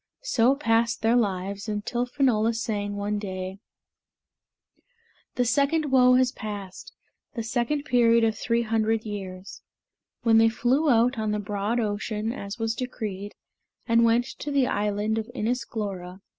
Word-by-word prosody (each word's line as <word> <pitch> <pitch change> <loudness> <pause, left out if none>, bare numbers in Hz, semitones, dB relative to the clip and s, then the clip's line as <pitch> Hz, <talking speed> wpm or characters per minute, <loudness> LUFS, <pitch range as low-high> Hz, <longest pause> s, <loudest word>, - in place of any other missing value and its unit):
So 265 - +3
passed 230 -4 +1
their 225 +2 +4
lives 200 -2 -1
until 215 +4 -2
Finola 235 -4 +1
sang, 205 -3 -2
one 205 +1 -2
day, 190 -1 -5 1.8
"The 245 - +1
Second 280 +4 +1
Woe 250 -1 +6
has 255 -1 +3
passed 205 -6 -7 0.4
the 230 - -3
second 240 +6 -1
period 235 -4 +4
of 220 -1 +2
three 235 +2 0
hundred 225 0 0
years," 195 -2 -7 0.6
when 225 -1 +5
they 225 0 +5
flew 255 +7 +1
out 240 0 +3
on 215 -1 -1
the 210 - 0
broad 205 +3 -2
ocean, 215 +1 -2
as 200 -6 -6
was 225 -1 -1
decreed, 210 -5 -5 0.5
and 230 0 +4
went 230 +1 +3
to 295 - -4
the 280 -2 +2
island 210 0 0
of 220 +1 -6
Inis 240 +1 -1
Glora. 190 -4 -5
225 Hz, 145 wpm, -26 LUFS, 205-245 Hz, 1.8 s, Woe